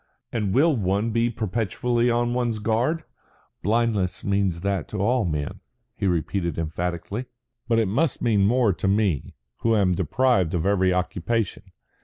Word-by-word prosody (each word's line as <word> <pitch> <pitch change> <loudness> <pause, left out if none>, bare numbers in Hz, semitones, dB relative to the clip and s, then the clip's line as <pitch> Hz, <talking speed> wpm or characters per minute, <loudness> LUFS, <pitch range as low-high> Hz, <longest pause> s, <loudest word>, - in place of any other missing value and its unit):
And 105 -5 -1
will 150 - +4
one 100 +1 0
be 115 +1 +2
perpetually 115 +2 0
on 120 0 +1
one's 120 -3 0
guard? 115 +10 0 0.6
Blindness 105 -3 0
means 100 -4 0
that 100 -4 -1
to 105 - -6
all 115 +3 +2
men," 75 -4 -3 0.4
he 100 - -1
repeated 85 -1 -1
emphatically. 85 +8 -3 0.4
"But 115 -2 +2
it 110 -2 +2
must 135 +9 +1
mean 105 -4 +3
more 120 -3 +3
to 95 - -3
me, 100 -7 0 0.2
who 115 -1 +2
am 95 -4 +3
deprived 95 - +1
of 85 - -1
every 95 -2 +3
occupation. 90 +4 -1
105 Hz, 150 wpm, -24 LUFS, 90-120 Hz, 0.6 s, will